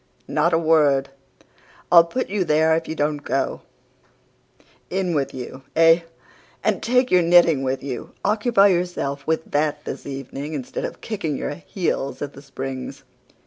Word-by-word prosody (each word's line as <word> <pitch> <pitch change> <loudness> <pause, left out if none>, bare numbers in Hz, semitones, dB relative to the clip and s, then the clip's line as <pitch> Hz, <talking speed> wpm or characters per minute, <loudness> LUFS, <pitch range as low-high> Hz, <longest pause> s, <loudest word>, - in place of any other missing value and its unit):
No, - - -8
not 165 +3 +2
a - - +5
word! 150 -4 +3 0.8
I'll 170 -1 +8
put 255 +9 -3
you 200 -1 0
there 160 0 +3
if 165 0 -2
you 160 - -4
don't 150 0 0
go. 135 - -1 1.3
In 185 -2 -1
with 140 -3 0
you 130 +1 -8
ay, 165 +1 +5 0.6
and - - +1
take 250 +1 +2
your 180 - +5
knitting 170 -4 +5
with 130 0 -2
you. 130 -4 -6
Occupy 210 -1 +4
yourself 175 -6 -2
with 160 0 -1
that 150 0 0
this - - -6
evening 140 +2 -6
instead 135 -4 -4
of - - -7
kicking 165 -10 -3
your - - -3
heels 145 -5 -3
at 145 -1 -6
The 140 - -12
Springs! 135 -2 -6
155 Hz, 160 wpm, -22 LUFS, 140-175 Hz, 1.3 s, I'll